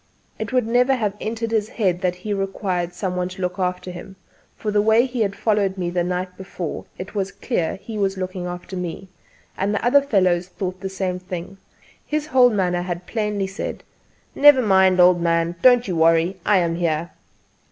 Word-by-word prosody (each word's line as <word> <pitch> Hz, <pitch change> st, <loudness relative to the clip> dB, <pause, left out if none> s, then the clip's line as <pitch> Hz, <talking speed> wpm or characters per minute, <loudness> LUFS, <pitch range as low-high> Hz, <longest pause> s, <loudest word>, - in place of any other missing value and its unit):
It 220 Hz, -2 st, -4 dB
would 255 Hz, -3 st, +2 dB
never 250 Hz, +3 st, +3 dB
have 210 Hz, -5 st, -1 dB
entered 225 Hz, +1 st, -3 dB
his 220 Hz, -1 st, 0 dB
head 185 Hz, -5 st, 0 dB
that 180 Hz, -2 st, 0 dB
he 205 Hz, +4 st, -4 dB
required 190 Hz, -3 st, -2 dB
some 180 Hz, 0 st, -3 dB
one 180 Hz, 0 st, -1 dB
to 185 Hz, +1 st, -9 dB
look 180 Hz, +1 st, -3 dB
after 180 Hz, 0 st, -2 dB
him; 180 Hz, +2 st, -10 dB, 0.4 s
from 210 Hz, -, -3 dB
the 205 Hz, -, +4 dB
way 220 Hz, +3 st, +4 dB
he 250 Hz, -2 st, -3 dB
had 200 Hz, -2 st, 0 dB
followed 205 Hz, -3 st, 0 dB
me 175 Hz, -2 st, -2 dB
the 175 Hz, 0 st, 0 dB
night 180 Hz, +1 st, -3 dB
before 185 Hz, -3 st, -6 dB
it 190 Hz, +2 st, -7 dB
was 195 Hz, -2 st, -2 dB
clear 175 Hz, -10 st, -2 dB
he 215 Hz, +2 st, -7 dB
was 195 Hz, -1 st, 0 dB
looking 185 Hz, -1 st, -4 dB
after 180 Hz, +2 st, -7 dB
me; 180 Hz, +1 st, -5 dB, 0.5 s
and 200 Hz, +2 st, -1 dB
the 205 Hz, -, -2 dB
other 280 Hz, +4 st, +5 dB
fellows 185 Hz, -9 st, +1 dB
thought 185 Hz, 0 st, -5 dB
the 190 Hz, 0 st, -4 dB
same 185 Hz, -1 st, -3 dB
thing. 185 Hz, +1 st, -7 dB, 0.4 s
His 300 Hz, 0 st, -2 dB
whole 260 Hz, -5 st, +5 dB
manner 180 Hz, -5 st, 0 dB
had 175 Hz, 0 st, -5 dB
plainly 210 Hz, -2 st, -2 dB
said: 195 Hz, +2 st, -6 dB, 0.5 s
"Never 290 Hz, -3 st, +6 dB
mind 190 Hz, -3 st, +4 dB
old 180 Hz, -1 st, +6 dB
man! 170 Hz, 0 st, +1 dB
Don't 245 Hz, -2 st, +5 dB
you 180 Hz, -, -2 dB
worry: 165 Hz, +3 st, +3 dB
I 205 Hz, -1 st, +5 dB
am 170 Hz, -2 st, 0 dB
here." 170 Hz, -1 st, -1 dB
190 Hz, 195 wpm, -22 LUFS, 180-215 Hz, 0.5 s, Never